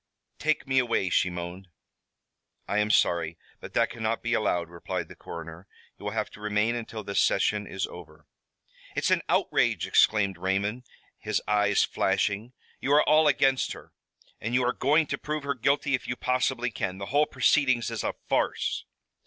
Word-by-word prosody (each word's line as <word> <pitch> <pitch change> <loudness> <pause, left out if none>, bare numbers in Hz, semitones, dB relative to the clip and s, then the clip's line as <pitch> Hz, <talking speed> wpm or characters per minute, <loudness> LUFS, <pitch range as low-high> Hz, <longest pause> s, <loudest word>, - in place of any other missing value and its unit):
"Take 155 -2 0
me 130 0 +3
away," 115 -7 0
she 95 - +3
moaned. 90 +2 -7 1.0
"I 105 - +1
am 105 0 +1
sorry, 85 -5 +2 0.2
but - - -10
that - - +2
cannot 115 -1 -2
be 120 0 0
allowed," 90 -7 +1
replied 85 0 -5
the - - -11
coroner. 85 +3 -9 0.3
"You - - -10
will - - -1
have - - -2
to 105 - -13
remain 105 +2 +1
until 115 -2 -5
this 100 0 -1
session 105 +1 +1
is 95 -1 -2
over." 80 -3 -12 0.7
"It's - - +1
an - - +3
outrage!" - - +2
exclaimed 100 -4 +3
Raymond, 100 +6 -1 0.3
his - - -1
eyes 105 -1 +3
flashing. 105 +4 0 0.3
"You 140 - 0
are 150 - +5
all 155 +1 +5
against 135 -1 +2
her, - - -14 0.5
and 115 +3 -2
you 125 -1 +3
are 125 - +1
going 150 +4 +3
to - - -4
prove 150 -1 -3
her 140 0 -1
guilty 140 +3 +1
if 130 - -1
you 125 - -2
possibly 125 -1 0
can. 95 -3 -3
The 100 - -5
whole 150 +1 +4
proceedings 130 -6 +2
is 115 -3 -3
a - - -1
farce." - - 0
110 Hz, 180 wpm, -27 LUFS, 95-130 Hz, 1.0 s, are